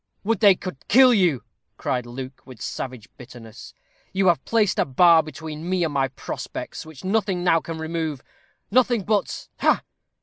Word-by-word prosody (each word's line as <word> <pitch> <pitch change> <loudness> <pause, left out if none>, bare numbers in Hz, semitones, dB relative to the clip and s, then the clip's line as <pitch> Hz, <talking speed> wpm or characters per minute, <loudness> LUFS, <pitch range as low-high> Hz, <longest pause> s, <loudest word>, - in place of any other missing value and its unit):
"Would 220 0 0
they 200 -3 +7
could 180 -5 -7
kill 255 +2 +7
you," 175 - +2 0.3
cried 125 -2 -2
Luke, 130 +2 -8
with 130 -4 -13
savage 125 -3 -6
bitterness. 115 -2 -12 0.4
"You 190 0 +3
have 170 - +1
placed 215 -4 +1
a - - +3
bar 165 +5 +5
between 155 +2 -7
me 185 -1 +1
and 160 -3 -1
my 135 -1 +1
prospects, 135 +4 -7
which 160 -4 -12
nothing 195 -1 +1
can 175 - -4
now 165 -2 +4 0.2
remove 160 -4 -3 0.5
nothing 240 -2 +3
but 210 +1 -1
ha!" - - +3
165 Hz, 165 wpm, -23 LUFS, 135-195 Hz, 0.5 s, they